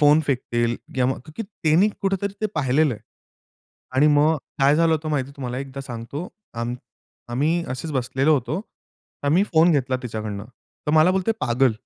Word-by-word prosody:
Phone 150 +1 +6
फेकतील 120 -3 0 0.2
किंवा 130 -1 +2
मग 130 - -3
का 155 - -11
की 225 - -2
त्यांनी 185 -1 +2
कुठेतरी 195 0 0
ते 215 - +2
पाहिलेलंय. 140 -3 +2 1.0
आणि 145 +3 +5
मग 155 +2 +4 0.2
काय 140 +2 +5
झालं 165 0 +4
होतं 155 0 -1
माहिती 140 -3 -1
तुम्हाला 125 -2 -4
एकदा 135 0 -6
सांगतो. 135 +5 -6 0.3
आम 120 +1 -2 0.6
आम्ही 160 +7 +1
असेच 130 +5 -4
बसलेलो 135 +4 +2
होतो. 140 +6 -1 0.6
तर 145 - 0
मी 190 - +5
फोन 165 +1 +6
घेतला 130 -3 +1
तिच्याकडनं. 110 -4 -4 0.4
तर 150 - +2
मला 155 +3 +6
बोलते 190 +3 +1
पागल. 125 0 +3
140 Hz, 165 wpm, -23 LUFS, 125-160 Hz, 1.0 s, फोन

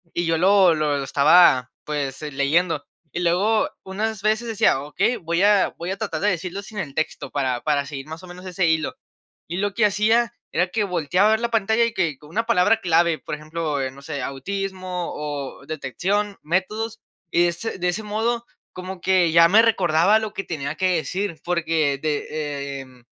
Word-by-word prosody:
Y 175 - 0
yo 165 -1 +1
lo 190 -1 +5
lo 150 -2 0
lo 140 - -2
estaba 140 -2 +5
pues, 145 -1 -4
eh, 150 - -4
leyendo. 150 +3 +1 0.3
Y 175 - -3
luego, 195 +6 +2
unas 210 +2 -3
veces 220 +3 +1
decía: 210 -10 +2
"Okey, 235 +11 0
voy 170 -1 -1
a 205 -2 +4
voy 170 - -4
a 195 - -3
tratar 195 -8 -3
de 205 - +3
decirlo 180 +2 -3
sin 210 +1 -10
el 155 -9 -4
texto, 155 -2 -2
para 130 -4 -1
para 145 -2 +1
seguir 135 -2 -7
más 160 +2 -8
o - - -10
menos 180 +1 -11
ese 185 -1 0
hilo". 160 -1 0 0.6
Y 175 - -2
lo 205 0 -1
que 225 - 0
hacía, 220 +3 +2 0.2
era 180 - +1
que 215 +2 0
volteaba 180 +3 +2
a - - +4
ver 220 - +2
la 235 - 0
pantalla, 220 +1 +2
y 230 - -3
que 160 -7 0
con 150 - -15
una 225 +7 -1
palabra 225 0 +3
clave, 170 -2 +3
por - - -7
ejemplo 155 -1 -3
no 140 - -14
sé, 140 -2 -4
autismo 185 +4 -4
o 145 -2 -5
detección, 190 +9 -2
métodos. 215 +7 -2 0.3
Y 170 - +3
de - - +4
ese 185 +4 -4
de 180 - 0
ese 185 +5 -3
modo, 230 +3 -1 0.3
como 185 0 -7
que 185 -3 +3
ya 165 0 +7
me 215 +4 +7
recordaba 195 -2 +3
lo 215 -1 -5
que 195 - -3
tenía 145 -3 -4
que 185 0 +1
decir. 180 0 -3
Porque 160 -5 0
de, 145 -2 -3
em, 130 -2 -16
175 Hz, 200 wpm, -23 LUFS, 150-205 Hz, 0.6 s, ya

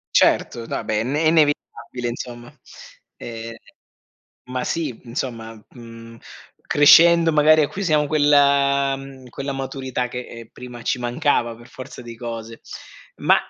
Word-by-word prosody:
Certo. 115 -1 +2
No, - - -5
vabbè 105 - -2
è - - -1
ne 150 +6 +1
inevitabile, 145 -5 0
insomma. 120 0 -8 0.7
Ehm, 115 0 -8 0.9
ma 125 0 -4
sì, 160 -6 -2
mhmm, - - -20
insomma, 115 -3 -6
mhmm, 115 -1 -12 0.5
crescendo, 165 +3 +6
magari, 155 +1 +5
acquisiamo 155 -2 0
quella 140 -2 +3
mhmm, 135 -2 -12
quella 140 +3 -5
maturità 130 -2 -4
che, 125 0 -6
ehm, 115 -1 -11
prima 125 -1 -10
ci 125 - -1
mancava 120 -1 0
per 120 +1 -16
forza 130 - -10
di 120 -1 -10
cose. 115 -1 -7 0.6
Ma, - - +2
130 Hz, 135 wpm, -21 LUFS, 120-145 Hz, 0.9 s, crescendo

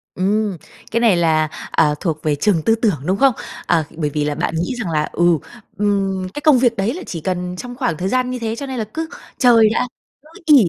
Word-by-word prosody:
Ừm, 200 0 0 0.3
cái 230 - +1
này 225 -6 +4
là, 160 -2 +2 0.2
à, 150 0 +3
thuộc 155 -3 -2
về 150 -2 +1
trường 175 0 +2
tư 225 +7 +3
tưởng, 220 -6 +1
đúng 190 +2 +1
không? 270 0 +4 0.3
À, 165 -2 +2
bởi 150 -3 0
vì 150 0 -1
là 145 0 -1
bạn 165 - -2
nghĩ 175 +10 -1
rằng 195 -8 -3
là, 150 -1 0
ừ, 175 -1 +3 0.4
"Ừm, 195 -2 0
cái 295 - -5
công 295 -5 +5
việc 240 -2 +3
đấy 200 +6 0
là 365 - -6
chỉ 165 -3 -6
cần 180 0 -2
trong 245 +3 -7
khoảng 245 - -1
thời 185 +2 -2
gian 255 0 +1
như 250 0 -3
thế, 225 -1 -2
cho 280 - -5
nên 265 -2 -5
là 220 - -1
cứ 320 0 -3 0.3
chơi 230 -4 +6
đã, 250 +2 0 0.3
cứ 305 - -20 0.2
ỷ 300 -2 +7
200 Hz, 240 wpm, -19 LUFS, 170-245 Hz, 0.4 s, ỷ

